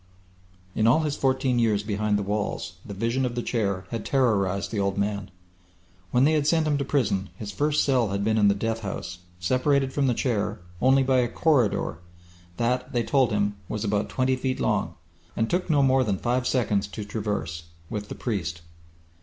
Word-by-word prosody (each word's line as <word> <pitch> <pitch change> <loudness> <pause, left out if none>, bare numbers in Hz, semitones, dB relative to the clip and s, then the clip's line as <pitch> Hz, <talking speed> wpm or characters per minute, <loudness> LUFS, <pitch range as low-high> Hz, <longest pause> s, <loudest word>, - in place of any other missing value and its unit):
In 110 +2 +2
all 150 +8 +5
his 150 -2 -1
fourteen 130 -2 +1
years 105 -3 +2
behind 105 0 0
the 100 - -2
walls 105 +1 -3
the 100 - -8
vision 115 +6 0
of 125 -2 -2
The 120 - -2
Chair 100 -6 -1
had 115 -3 -3
terrorized 100 -8 +1
the 110 - -2
old 100 0 0
man. 100 -1 -1 0.8
When 125 +1 +3
they 150 - +5
had 150 -2 +1
sent 160 0 +3
him 145 -2 +1
to - - 0
prison 105 -9 0
his 105 +1 -6
first 150 +8 +1
cell 130 -5 +2
had 100 +1 -1
been 110 +1 +2
in 105 - +5
the 100 - +4
death 115 +2 -2
house, 95 -4 -5 0.2
separated 130 +7 +1
from 140 -2 +1
The 125 - +2
Chair 105 -4 -1 0.2
only 135 +1 +5
by 130 -1 +3
a 120 - +2
corridor 125 - +1 0.6
that, 125 +2 -1
they 120 -1 +1
told 130 -3 +2
him, 105 -1 0
was 105 0 -3
about 105 -1 0
twenty 130 0 +1
feet 130 0 -2
long, - - 0 0.4
and 115 - +1
took 180 +5 -1
no 145 -3 +4
more 130 0 +4
than 100 -5 0
five 125 +4 0
seconds 105 -6 +1
to 105 +1 -7
traverse 100 -6 -3 0.3
with 105 -2 -4
the - - -5
priest. 85 -9 -3
115 Hz, 195 wpm, -26 LUFS, 100-130 Hz, 0.8 s, all